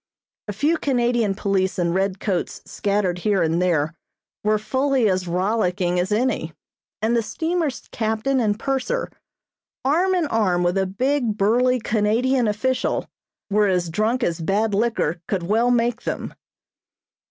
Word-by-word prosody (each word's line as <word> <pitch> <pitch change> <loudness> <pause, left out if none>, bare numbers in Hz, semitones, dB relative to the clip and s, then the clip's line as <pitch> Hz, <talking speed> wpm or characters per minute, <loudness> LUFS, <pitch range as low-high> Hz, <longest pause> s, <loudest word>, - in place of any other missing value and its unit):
A 205 - -3
few 305 - +1
Canadian 240 -7 +1
police 195 -2 0
in 170 -2 +1
red 190 0 0
coats 185 -5 -2
scattered 200 -3 -1
here 200 0 +1
and 165 +2 +1
there 165 -3 +1 0.5
were 215 0 +3
fully 260 +3 +1
as 185 -2 0
rollicking 180 -1 0
as 180 +3 -1
any, 210 -8 0 0.5
and 230 +2 +2
the 235 - +3
steamer's 320 +3 -2
captain 220 +4 0
and 210 -3 +1
purser, 270 - -2 0.7
arm 355 +7 +2
in 350 -3 +1
arm 205 -9 +1
with 175 +2 +1
a 190 - 0
big, 245 +2 0
burly 245 +5 +3
Canadian 230 +4 +1
official, 250 +5 0 0.5
were 210 0 +3
as 180 -3 0
drunk 225 +7 0
as 170 -3 -1
bad 205 +5 +1
liquor 200 -6 0
could 190 -4 -1
well 225 +7 +2
make 240 0 +1
them. - - -4
215 Hz, 145 wpm, -22 LUFS, 185-250 Hz, 0.7 s, were